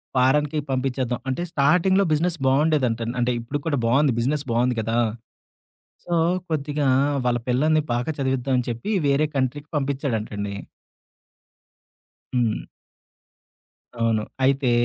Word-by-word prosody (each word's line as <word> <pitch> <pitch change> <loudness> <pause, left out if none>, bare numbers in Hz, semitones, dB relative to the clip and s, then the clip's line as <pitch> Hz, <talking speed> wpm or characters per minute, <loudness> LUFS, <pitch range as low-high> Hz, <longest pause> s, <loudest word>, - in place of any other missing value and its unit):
ఫారన్‌కి 150 +4 +2
పంపించేద్దాం. 130 -1 -1
అంటే 130 +6 -2
స్టార్టింగ్‌లో 180 +7 +3
బిజినెస్ 170 +3 +1
బావుండేదంటా. 130 -5 +2 0.2
అంటే 120 +1 +2
ఇప్పుడుకి 140 +5 -4
కూడా 145 -4 +1
బావుంది. 135 +3 +3
బిజినెస్ 140 +5 0
బావుంది 120 +1 +1
కదా! 115 +2 -1 1.1
సో, 175 - -7 0.4
కొద్దిగా 145 -1 -1 0.4
వాళ్ళ 120 -1 +2
పిల్లల్ని 155 +5 +3
బాగా 120 +5 -1
చదివిద్దాం 135 -1 0
అని 125 - -2
చెప్పి 120 - -4 0.2
వేరే 140 +2 +3
కంట్రీకి 135 +3 -1
పంపించాడంటండి. 115 -8 -2 1.8
హ్మ్. 115 -3 +1 1.4
అవును. 115 -2 +1 0.2
అయితే 135 -1 +2
135 Hz, 110 wpm, -23 LUFS, 120-150 Hz, 1.8 s, స్టార్టింగ్‌లో